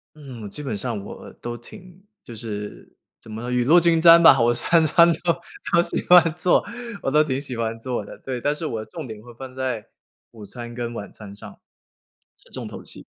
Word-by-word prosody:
嗯， 135 -7 -10
我 - - -6
基 150 - -8
本 130 -8 -4
上 110 0 -3
我 - - -10
都 120 0 -5
挺 180 - -15 0.2
就 120 - -10
是 105 -2 -7 0.3
怎 110 - -13
么 115 +3 -5
雨 125 0 +1
露 160 +8 +6
均 170 -1 +3
沾 170 0 +8
吧。 135 -6 +7
我 120 +1 +3
3 165 +6 +3
餐 170 +2 +6 0.2
都 170 -1 +3 0.4
都 170 - +5
喜 - - -4
欢 175 -2 +7
做， 175 0 +2 0.4
我 - - -1
都 150 +3 +4
挺 135 -3 -2
喜 140 -3 -6
欢 115 0 -3
做 120 -2 -3
的。 - - -11
对， 130 -2 -6
但 145 +3 +1
是 160 - -6
我 115 -7 -3
重 160 -5 -8
点 110 -2 -9
会 120 +2 -14
放 130 +2 -10
在 130 -4 -3 0.4
午 110 -3 -12
餐 120 +3 -9
跟 120 0 -4
晚 105 -3 -7
餐 100 -2 -11
上， - - -12 0.9
是 - - -21
重 - - -6
头 - - -9
戏。 - - -9
125 Hz, 230 characters per minute, -23 LUFS, 115-155 Hz, 0.9 s, 沾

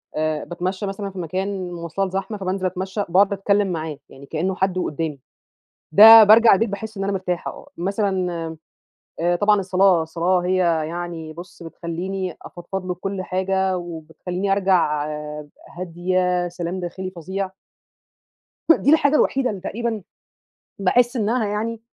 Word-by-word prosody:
آآ 155 0 -1
باتمشي 185 +3 -3
مثلًا 195 +1 -4
في 190 - -8
مكان 185 +2 -3
مواصلات 175 +3 -3
زحمة 195 +3 -3
فبانزل 190 0 -2
أتمشى، 190 +3 -2
بأقعد 195 +3 +4
أتكلم 200 0 +1
معاه 160 -3 -4
يعني 140 - -13
كأنّه 175 +6 -2
حد 190 -1 0
وقدامي، 155 -4 -3 0.7
ده 220 +4 +11
بارجع 225 +2 +7
البيت 225 +4 +1
باحس 215 +2 -6
إن 195 - -2
أنا 200 - -1
مرتاحة 180 -2 -2
آه - - -13
مثلًا 190 0 -1
آآ 165 -1 -5 0.6
آآ 175 +1 +2
طبعًا 205 +1 +3
الصلاة 185 -2 +3
الصلاة 170 +3 0
هي 180 +1 0 0.3
يعني 170 -2 -6
بُص 175 +2 -11
بتخلّيني 175 +2 -5
أفضفض 185 +2 -7
له 180 - -2
بكُل 195 +2 -4
حاجة 190 +1 0
وبتخلّيني 175 +3 -4
أرجع 180 -7 +2 0.7
هادية 180 0 0
سلام 175 +1 -4
داخلي 185 +2 -5
فظيع. 190 +2 -4 1.3
دي 285 - +2
الحاجة 290 -2 +4
الوحيدة 265 -1 +2
اللي 200 -3 -6
تقريبًا 225 +2 -3 0.8
باحس 240 +6 +2
إنها 225 0 0
يعني 220 +2 -3
185 Hz, 140 wpm, -22 LUFS, 175-200 Hz, 1.3 s, ده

